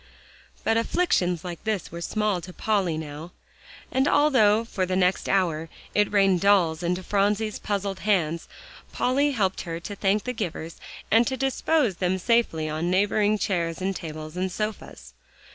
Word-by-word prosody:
But 225 Hz, -, +2 dB
afflictions 190 Hz, -, +1 dB
like 175 Hz, -2 st, -7 dB
this 215 Hz, -5 st, -2 dB
were 170 Hz, +1 st, -7 dB
small 210 Hz, -1 st, 0 dB
to 180 Hz, -, -9 dB
Polly 195 Hz, -7 st, 0 dB
now, 155 Hz, +2 st, -7 dB, 0.6 s
and 265 Hz, +2 st, +2 dB
although 230 Hz, -8 st, +4 dB
for 195 Hz, -4 st, -2 dB
the 185 Hz, 0 st, -1 dB
next 185 Hz, 0 st, +1 dB
hour 165 Hz, -4 st, +1 dB, 0.2 s
it 210 Hz, 0 st, +2 dB
rained 195 Hz, -3 st, +3 dB
dolls 180 Hz, -5 st, +3 dB
into 180 Hz, +1 st, -1 dB
Phronsie's 205 Hz, +2 st, 0 dB
puzzled 200 Hz, -2 st, -2 dB
hands, 170 Hz, -6 st, 0 dB, 0.4 s
Polly 280 Hz, +3 st, +1 dB
helped 195 Hz, -6 st, 0 dB
her 165 Hz, -2 st, -5 dB
to 205 Hz, +4 st, -6 dB
thank 200 Hz, +1 st, +1 dB
the 250 Hz, -, -3 dB
givers 170 Hz, -6 st, -5 dB, 0.3 s
and 230 Hz, +2 st, +5 dB
to 260 Hz, -, -2 dB
dispose 270 Hz, -, +1 dB
them 185 Hz, 0 st, 0 dB
safely 185 Hz, -6 st, +1 dB
on 155 Hz, +3 st, -2 dB
neighboring 205 Hz, +3 st, +2 dB
chairs 170 Hz, -5 st, -1 dB
and 190 Hz, +1 st, -2 dB
tables 155 Hz, -2 st, -7 dB
and 185 Hz, +1 st, -2 dB
sofas. 210 Hz, +3 st, -5 dB
195 Hz, 160 wpm, -25 LUFS, 175-215 Hz, 0.6 s, and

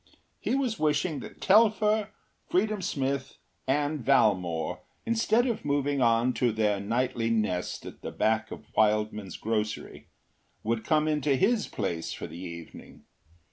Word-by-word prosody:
He -, -, 0 dB
was 255 Hz, -5 st, -1 dB
wishing 155 Hz, +1 st, +1 dB
that -, -, -10 dB
Telfer, 215 Hz, +1 st, +4 dB, 0.4 s
Freedom 210 Hz, +2 st, +1 dB
Smith, 135 Hz, -4 st, -2 dB, 0.3 s
and 145 Hz, +1 st, 0 dB
Valmore, 95 Hz, -10 st, +2 dB, 0.3 s
instead 230 Hz, +1 st, +2 dB
of 235 Hz, -4 st, -2 dB
moving 145 Hz, -1 st, 0 dB
on 120 Hz, +1 st, +3 dB
to 120 Hz, -1 st, +1 dB
their 105 Hz, -2 st, +1 dB
nightly 115 Hz, +2 st, 0 dB
nest 105 Hz, -6 st, -1 dB
at -, -, -10 dB
the -, -, -5 dB
back 110 Hz, 0 st, 0 dB
of -, -, -9 dB
Wildman’s 105 Hz, -2 st, +1 dB
grocery, 110 Hz, -1 st, -3 dB, 0.6 s
would 115 Hz, 0 st, -1 dB
come 155 Hz, -1 st, +2 dB
into 150 Hz, -2 st, +2 dB
his 210 Hz, -, +2 dB
place 90 Hz, -8 st, -3 dB
for -, -, -6 dB
the 80 Hz, -, -9 dB
evening. 85 Hz, -2 st, -10 dB
130 Hz, 140 wpm, -28 LUFS, 105-160 Hz, 0.6 s, Telfer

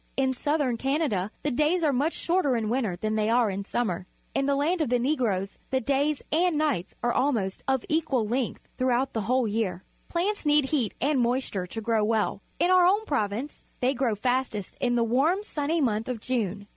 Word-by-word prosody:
In 265 Hz, -1 st, +2 dB
Southern 285 Hz, -2 st, 0 dB
Canada 270 Hz, -, 0 dB
the 295 Hz, -, 0 dB
days 305 Hz, +7 st, +2 dB
are 295 Hz, -3 st, +3 dB
much 290 Hz, +6 st, +1 dB
shorter 335 Hz, -7 st, +1 dB
in 220 Hz, -2 st, -1 dB
winter 235 Hz, -8 st, 0 dB
than 215 Hz, +4 st, -2 dB
they 215 Hz, 0 st, +1 dB
are 235 Hz, -2 st, +3 dB
in 195 Hz, +1 st, -3 dB
summer. 185 Hz, -6 st, -2 dB, 0.3 s
In 275 Hz, -, 0 dB
the 280 Hz, -, +2 dB
land 320 Hz, +5 st, +1 dB
of 305 Hz, -, 0 dB
the 250 Hz, -, +3 dB
Negroes 235 Hz, -8 st, -1 dB
the 260 Hz, -, +1 dB
daj's 280 Hz, +3 st, 0 dB
and 340 Hz, 0 st, +2 dB
nights 290 Hz, -, -1 dB
are 240 Hz, 0 st, +2 dB
almost 225 Hz, -9 st, 0 dB
of 265 Hz, -2 st, +1 dB
equal 290 Hz, -8 st, +1 dB
length 245 Hz, +2 st, -2 dB
throughout 255 Hz, +1 st, +1 dB
the 220 Hz, -, -1 dB
whole 250 Hz, +3 st, +1 dB
year. 205 Hz, -4 st, -2 dB, 0.3 s
Plants 390 Hz, +5 st, -1 dB
need 295 Hz, -2 st, +4 dB
heat 265 Hz, -6 st, -1 dB
and 280 Hz, +1 st, +2 dB
moisture 240 Hz, -6 st, 0 dB
to 225 Hz, +5 st, -6 dB
grow 220 Hz, -1 st, +1 dB
well. 220 Hz, 0 st, 0 dB, 0.2 s
In 360 Hz, -, +2 dB
our 365 Hz, -1 st, +6 dB
own 410 Hz, +4 st, +2 dB
province 245 Hz, -, -2 dB, 0.2 s
they 255 Hz, +2 st, +2 dB
grow 245 Hz, -4 st, 0 dB
fastest 245 Hz, -3 st, -1 dB
in 245 Hz, -1 st, +2 dB
the 235 Hz, -, +3 dB
warm, 285 Hz, -, +2 dB
sunny 315 Hz, -3 st, -1 dB
month 225 Hz, -4 st, 0 dB
of 250 Hz, -3 st, -3 dB
June. 210 Hz, -5 st, -2 dB
255 Hz, 200 wpm, -27 LUFS, 220-295 Hz, 0.3 s, our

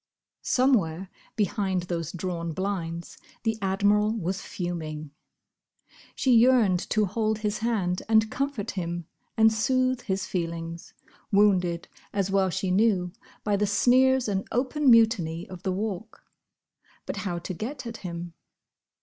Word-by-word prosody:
Somewhere 195 Hz, -9 st, +1 dB, 0.2 s
behind 195 Hz, -4 st, 0 dB
those 170 Hz, -2 st, -3 dB
drawn 170 Hz, -2 st, -4 dB
blinds 170 Hz, -3 st, -4 dB, 0.2 s
the 225 Hz, -1 st, +1 dB
Admiral 205 Hz, +2 st, +2 dB
was 185 Hz, -2 st, -2 dB
fuming. 155 Hz, -4 st, -5 dB, 1.0 s
She 260 Hz, -, +1 dB
yearned 230 Hz, -6 st, +5 dB
to 215 Hz, -1 st, +2 dB
hold 215 Hz, +2 st, 0 dB
his 210 Hz, -1 st, -2 dB
hand 205 Hz, -6 st, 0 dB
and 220 Hz, -1 st, +4 dB
comfort 275 Hz, -7 st, -2 dB
him 175 Hz, -2 st, -4 dB, 0.3 s
and 220 Hz, 0 st, +6 dB
soothe 255 Hz, +3 st, +1 dB
his 190 Hz, -3 st, -2 dB
feelings, 170 Hz, -2 st, -4 dB, 0.4 s
wounded, 185 Hz, -4 st, +3 dB, 0.3 s
as 195 Hz, -1 st, 0 dB
well 195 Hz, -1 st, +3 dB
she 190 Hz, +1 st, -2 dB
knew, 185 Hz, -3 st, +2 dB, 0.3 s
by 205 Hz, -1 st, +1 dB
the 205 Hz, +1 st, +1 dB
sneers 255 Hz, +4 st, +4 dB
and 195 Hz, -2 st, -1 dB
open 265 Hz, +3 st, +1 dB
mutiny 220 Hz, -8 st, +4 dB
of 185 Hz, -2 st, -9 dB
the 190 Hz, -, -1 dB
Walk. 210 Hz, +2 st, -4 dB, 0.8 s
But -, -, -4 dB
how 180 Hz, -4 st, -3 dB
to 170 Hz, +2 st, -5 dB
get 255 Hz, -, -5 dB
at 230 Hz, -1 st, -6 dB
him? 170 Hz, -1 st, -6 dB
195 Hz, 130 wpm, -26 LUFS, 175-225 Hz, 1.0 s, and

